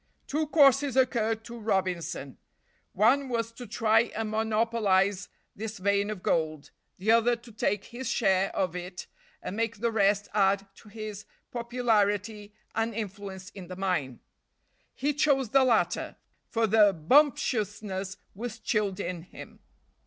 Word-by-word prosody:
Two 305 +2 -1
courses 275 -3 +4
occurred 225 -4 +1
to 235 0 -9
Robinson; 185 - -2 0.5
one 260 +7 +3
was 230 -2 -1
to 245 +1 -10
try 225 +2 +3
and 220 0 -2
monopolize 215 -3 +1 0.3
this 220 +2 -5
vein 200 +2 +1
of 210 -4 -6
gold, 155 -3 -1 0.3
the 205 +4 +1
other 230 +1 +4
to 235 0 -15
take 205 -2 -1
his 245 0 -6
share 195 -4 +2
of 180 -2 -1
it 180 0 -6 0.4
and 190 - -5
make 230 0 -1
the 235 +2 0
rest 205 -1 +2
add 195 -1 +2
to 210 - -17
his 215 -1 -7 0.3
popularity 215 -4 0 0.2
and 225 0 -1
influence 200 -2 -6
in 185 -3 -10
the 185 - -7
mine. 180 -10 -2 0.8
He 290 +3 0
chose 275 -4 +2
the 270 +3 +5
latter, 220 -9 +1 0.3
for 230 -1 +1
the 210 -2 +5
bumptiousness 205 - +1 0.2
was 225 +3 -6
chilled 210 -4 -1
in 180 -3 -4
him. 180 - -12
215 Hz, 140 wpm, -28 LUFS, 195-230 Hz, 0.8 s, the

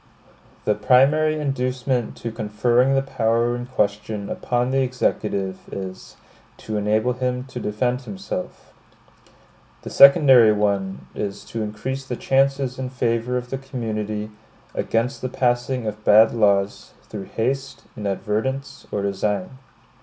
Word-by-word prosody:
The 105 - +3
primary 150 +6 +3
inducement 130 -3 -1
to 115 - -5
conferring 120 +4 +1
the 135 - +2
power 115 -2 +1
in 120 0 -6
question 105 -3 -2
upon 125 +1 -1
the 135 0 +2
Executive 105 -7 -1
is, 95 -1 -7 0.4
to 110 - -6
enable 110 +4 +1
him 125 0 -2
to 130 - -8
defend 125 +4 -1
himself; 185 +4 -7 1.1
the - - -7
secondary 135 -6 +7
one 100 -2 -1
is 100 -1 -5
to 115 - -5
increase 110 +6 -4
the 130 -2 -4
chances 135 0 +1
in 130 -1 -3
favor 125 -1 -1
of 125 0 -6
the 135 - -2
community 110 -5 -4 0.4
against 120 +4 -1
the 130 - -2
passing 125 0 0
of 105 0 -5
bad 110 +2 +6
laws, 100 -3 +1
through 100 -3 -7
haste, 135 +6 -3
inadvertence, 110 +6 -3
or 100 - -2
design. 100 +4 -2
120 Hz, 130 wpm, -22 LUFS, 105-130 Hz, 1.1 s, secondary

